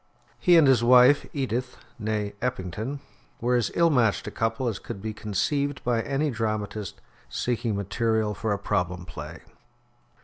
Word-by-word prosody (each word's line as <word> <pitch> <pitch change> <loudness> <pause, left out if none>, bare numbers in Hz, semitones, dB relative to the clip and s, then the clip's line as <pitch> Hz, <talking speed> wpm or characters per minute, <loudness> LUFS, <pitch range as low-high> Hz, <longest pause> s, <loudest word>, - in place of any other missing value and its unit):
He 175 -2 +5
and 160 - +7
his 130 -3 +4
wife, 125 +3 +6
Edith 125 -2 -3 0.2
(nee 105 -1 -2
Eppington), 125 +3 -3 0.4
were 125 +1 +1
as 120 -4 +1
ill 170 -1 +4
matched 115 -7 +2
a - - -5
couple 115 +3 -1
as 110 -4 -2
could 115 -4 -7
be 110 +2 -4
conceived 140 +7 -1
by 120 -2 +1
any 145 +4 -1
dramatist 110 -2 -3 0.3
seeking 120 - -1
material 110 +2 0
for 105 +2 -2
a 100 - +1
problem 90 -3 -2
play. - - -8
115 Hz, 150 wpm, -26 LUFS, 105-130 Hz, 0.4 s, and